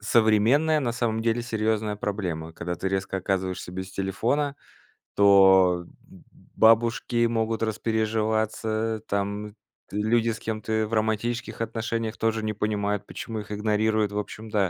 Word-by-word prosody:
современная, 120 +8 +3
на 120 -3 0
самом 115 -1 -1
деле, 115 +1 +1
серьёзная 110 -2 -1
проблема. 90 -6 -3
Когда 90 +1 -4
ты 95 +3 -3
резко 95 0 -2
оказываешься 95 -1 -2
без 95 +1 -6
телефона, 115 +10 -1 0.6
то 95 -3 +6 0.2
б - - -17
б - - -19 0.3
бабушки 120 +1 +4
могут 115 -1 -1
распереживаться, 110 0 -1
там 100 +1 -3 0.4
люди 110 +3 +1
с 115 - -3
кем 110 -1 -4
ты 110 0 0
в 115 - -9
романтических 110 +2 -1
отношениях 115 0 -2
тоже 110 0 0
не 110 - -1
понимают, 105 -1 -1
почему 110 -1 -6
их 105 0 -9
игнорируют. 105 0 +1
В - - -3
общем, 110 +1 -7
да, 100 -4 +2
110 Hz, 145 wpm, -26 LUFS, 100-115 Hz, 0.6 s, то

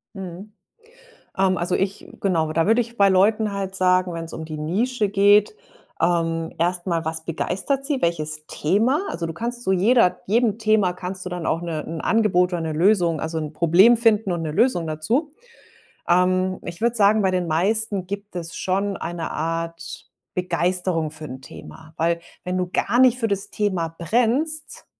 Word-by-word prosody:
Mhm. 190 +2 -8 0.8
Ähm, 190 -1 +2
also, 175 +1 -1
ich 195 +1 -2
genau, 165 -5 0
da 165 0 +1
würde 225 +3 +4
ich 235 0 -5
bei 200 -1 +5
Leuten 205 +3 +3
halt 195 -1 -4
sagen, 185 -1 +2
wenn's 165 0 -6
um 160 - -6
die 155 -1 -7
Nische 210 +8 -1
geht, 205 - +4 0.5
ähm, 165 -1 0
erst 175 +2 0
mal: 165 -2 -1
Was 160 0 -3
begeistert 200 - -2
sie, 275 -2 -1
welches 155 -2 -2
Thema? 220 - +1
Also, 165 -1 -3
du 165 - -5
kannst 240 +4 -4
zu 190 - +1
jeder 195 +1 +3
jedem 225 +1 +1
Thema 215 -4 +2
kannst 185 +1 -7
du - - -4
dann 180 -2 -5
auch 165 - 0
'ne 165 -3 -4
'n 160 0 -5
Angebot 185 -5 +2
oder 175 - -1
'ne 160 - -3
Lösung 170 -1 +2
also, 160 0 -3
'n 155 -1 -5
Problem 175 +9 +5
finden 225 -4 +2
und 170 -1 -2
'ne 155 -1 -3
Lösung 190 -4 +2
dazu. 225 - -1 0.8
Ähm, 185 +1 +2
ich 170 +2 -8
würde 235 +1 +1
sagen, 210 +1 +4
bei 190 - +2
den 180 -2 -1
meisten 195 +3 +1
gibt 200 0 -7
es 165 -1 -6
schon 195 +1 -1
eine 170 -1 -5
Art 165 +1 -4 0.3
Begeisterung 180 -2 0
für 155 0 -10
'n 130 -1 -8
Thema. 160 +3 -12
Weil, 170 +1 +1 0.2
wenn 180 0 -2
du 180 -1 -1
gar 240 - +1
nicht 255 -1 +5
für 225 - 0
das 200 -1 -3
Thema 190 -6 -1
brennst, 245 - 0
185 Hz, 180 wpm, -22 LUFS, 165-210 Hz, 0.8 s, bei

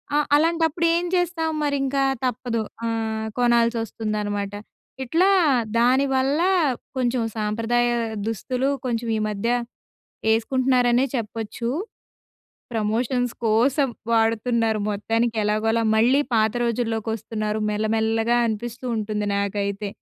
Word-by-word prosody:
ఆ! - - +4 0.2
అలాంటప్పుడేం 330 +2 +2
జేస్తాం, 350 -2 0
మరింకా 275 -1 0 0.2
తప్పదు. 240 -2 -1 0.2
ఆహ్, 220 -1 -2
కొనాల్సొస్తుందనమాట. 220 -4 0 0.5
ఇట్లా 335 +10 +2 0.5
దానివల్లా, 270 +6 +2 0.5
కొంచెం 245 -1 +1
సాంప్రదాయా 230 +3 +1 0.3
దుస్తులు, 255 +5 -1 0.2
కొంచెం 235 -1 -2
ఈ - - -1
మధ్య 210 +2 -3 0.9
ఏస్కుంటున్నారనే 250 +1 +2
చెప్పొచ్చు. 225 0 -4 1.1
ప్రమోషన్స్ 235 +3 0
కోసం 260 +6 +3 0.2
వాడుతున్నారు 225 -1 +1
మొత్తానికి 225 +3 -1
ఎలాగొలా, 220 +2 +1
మళ్ళీ 250 +6 +4
పాత 220 -1 +3
రోజుల్లోకొస్తున్నారు, 225 -2 -2
మెల్లమెల్లగా 225 +2 +1
అనిపిస్తూ 235 +3 -4
ఉంటుంది 210 -1 -2
నాకైతే. 200 0 -2
230 Hz, 85 wpm, -23 LUFS, 220-255 Hz, 1.1 s, ఆ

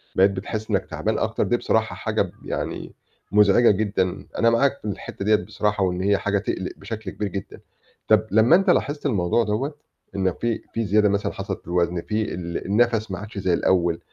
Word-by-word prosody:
بقيت 95 +1 +5
بتحس 105 +3 -5
إنّك - - +1
تعبان - - -2
أكتر، - - 0
دي - - +1
بصراحة - - 0
حاجة - - -1
ب - - -2
يعني - - -4 0.4
مُزعجة 105 +3 +5
جدًا 100 -3 -1
أنا 115 - +4
معاك 135 +4 +2
في - - -13
الحتّة 100 -1 -5
دِيّة 105 +1 +5
بصراحة، 105 -1 -1
وإن 90 -1 0
هي 100 +1 +3
حاجة 105 0 0
تقلق 95 -2 -3
بشكل 105 -1 -6
كبير 105 - -3
جدًا. 95 +1 -7 0.5
طَب - - +4
لمّا 110 +9 +6
أنت 195 +1 +2
لاحِظت 145 -4 +1
الموضوع 105 -3 +2
دَوّة، 120 +8 -2 0.4
إن 95 -2 +1
في 115 +4 -2
في 115 0 -1
زيادة 105 +1 +3
مثلًا 100 0 0
حصلت 95 0 -5
في - - -27
الوزن 85 0 0
في 110 0 -2
ال 85 -1 -5
النَفَس 110 +1 +1
ما 95 - -4
عادش 105 +1 -9
زي 95 -2 +1
الأوّل، 85 -1 +2
105 Hz, 195 wpm, -23 LUFS, 95-110 Hz, 0.5 s, لمّا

